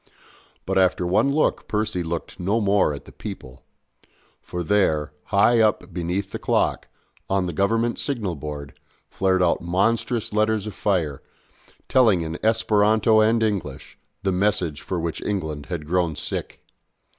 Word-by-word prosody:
But 95 0 +1
after 90 -1 +2
one 95 +10 +2
look 155 +2 +1
Percy 105 -3 -1
looked 85 0 -5
no 100 +6 +1
more 100 -5 +3
at 70 - -7
the - - -13
people; 65 +1 -9 0.8
for 90 0 -5
there, 80 -6 +1
high 115 +3 +4
up 105 -4 +1
beneath 90 +3 -2
the - - -5
clock, - - 0 0.4
on 95 -1 +1
the 85 - -3
Government 115 +7 +1
signal 110 - -2
board, 70 -1 -7 0.4
flared 95 -1 +2
out 85 - +2
monstrous 105 +6 0
letters 110 -1 +1
of 105 - -5
fire, 85 -9 -1 0.7
telling 110 -10 +4
in 80 +1 -6
Esperanto 110 0 +3
and 110 +1 +3
English, 95 -11 -3 0.3
the 95 - +1
message 90 -5 0
for 90 - -3
which 85 -1 -3
England 80 -8 -3
had 85 -4 -4
grown 85 -1 0
sick. - - -5
95 Hz, 145 wpm, -23 LUFS, 85-110 Hz, 0.8 s, high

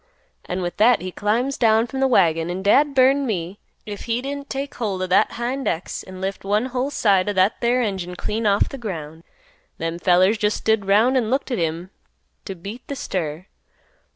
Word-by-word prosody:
An' 180 +1 -3
with 175 - -4
that 235 +3 +5
he 185 - -4
climbs 235 +8 -1
down 225 0 +4
from 265 +2 -5
th' 270 - +3
wagon, 165 -7 +3
an' 185 +2 -4
dad 280 +8 +3
burn 270 +1 +4
me 185 -2 -3 0.3
if 205 -2 -7
he 230 0 0
didn't 280 +2 -6
take 275 +1 -4
holt 205 -5 -3
o' - - 0
that 185 0 +2
hind 255 +3 -3
ex 165 +3 -3
an' 185 0 -11
lift 195 +1 -4
one 205 +4 +1
whole 260 +2 0
side 200 -8 +2
o' - - -1
that 190 +2 +2
there 245 +1 +2
engine 190 -4 -3
clean 215 +4 -2
off 200 0 +3
th' 275 - -8
ground. 165 -7 -6 0.5
Them 165 +1 -3
fellers 185 +5 +3
jest 210 -1 +1
stood 220 -2 +1
'round 225 +7 +4
an' 230 -4 0
looked 270 +2 -1
at 245 - -1
him 165 +3 -3 0.5
t' 195 - -6
beat 200 +8 -8
th' 280 - -5
stir. 170 - -4
210 Hz, 205 wpm, -22 LUFS, 185-250 Hz, 0.5 s, that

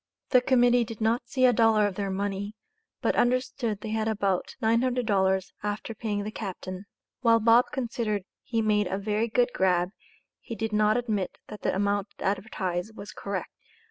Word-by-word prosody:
The 250 - +6
Committee 245 -1 +4
did 225 -2 -8
not 230 +2 +1
see 255 +1 +2
a 250 - +6
dollar 220 -2 +4
of 205 - -1
their 200 +1 -3
money, 200 +2 -3 0.5
but - - +2
understood 245 -3 0
they 220 - -5
had 220 0 0
about 200 -4 -1
$900, 220 -5 +1
after 210 +2 -3
paying 210 -2 -2
the 215 - -4
captain; 190 -2 -6 0.3
while 230 -3 +4
Bob 230 +2 +5
considered 230 -6 -2 0.2
he 230 -2 -1
made 210 -2 +2
a 190 +2 -2
"very 210 +3 0
good 245 +2 +2
grab," 180 -1 +2 0.5
he 230 - -7
did 225 -1 -3
not 215 +1 +3
admit 215 -6 -2
that 210 - -8
the - - 0
amount 200 +1 0
advertised 190 0 -2
was 205 - -8
correct. 200 -2 -4
215 Hz, 170 wpm, -27 LUFS, 200-230 Hz, 0.5 s, The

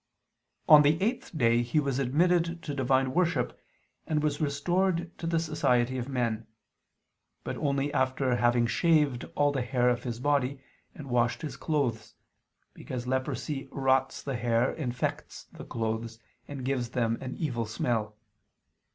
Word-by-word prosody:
On 150 -1 +9
the 150 +2 +3
eighth 215 -4 -2
day 115 -3 +3
he 120 +5 +1
was 140 -3 -1
admitted 170 +5 +1
to 145 - -4
divine 130 -1 +1
worship, 170 -8 0 0.5
and 150 -1 0
was 150 -1 0
restored 170 +4 0
to 165 - -4
the 165 0 +1
society 130 -6 +1
of 125 +2 -5
men; 115 -4 -1 1.0
but - - -4
only 140 -1 0
after 130 -1 +1
having 120 0 +3
shaved 145 0 +2
all 145 0 +3
the 135 -2 -1
hair 125 0 +1
of 120 0 0
his 120 -2 -5
body, 140 0 +1 0.4
and 145 - -9
washed 120 +4 +1
his 155 - -4
clothes, 140 -8 -2 0.6
because 125 -1 -6
leprosy 130 +2 -2
rots 135 -1 +1
the 135 -2 -3
hair, 115 +1 +1
infects 125 -5 -4
the - - -10
clothes, 110 0 -3 0.3
and 135 -3 -6
gives 130 -3 -1
them 115 -1 0
an 130 - -5
evil 120 -8 -2
smell. 110 -1 -2
130 Hz, 150 wpm, -29 LUFS, 120-150 Hz, 1.0 s, On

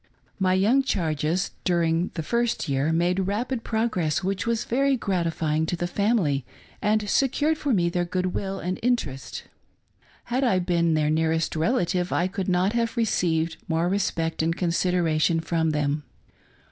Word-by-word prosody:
My 185 -1 +3
young 220 +9 +4
charges 165 - -1
during 170 0 +1
the 160 - -3
first 235 +3 0
year 140 +2 +1
made 180 +3 +1
rapid 230 +4 -2
pro 225 +1 0
gress, 175 -5 -1
which 195 +3 -2
was 230 0 0
very 275 +2 +1
gratifying 165 -6 -1
to 175 - -1
the 175 - -2
family 175 - +1 0.4
and 210 0 +1
secured 285 +7 +2
for 295 -2 -2
me 180 -7 +2
their 175 +1 0
good 180 +1 -2
will 195 -1 -3
and 180 +1 -3
interest. 145 - -2 0.8
Had 250 +3 -1
I 235 -8 +3
been 170 -2 +1
their 150 -1 +1
nearest 160 +1 0
relative 180 -1 0
I 175 - +1
could 190 0 -3
not 185 +3 +2
have 235 +1 -1
received 165 -7 +1
more 165 +1 +1
respect 170 -4 -1
and 165 +1 0
consider 180 0 +1
ation 160 +1 +2
from 160 -1 0
thfem. 150 0 0
180 Hz, 160 wpm, -25 LUFS, 160-210 Hz, 0.8 s, young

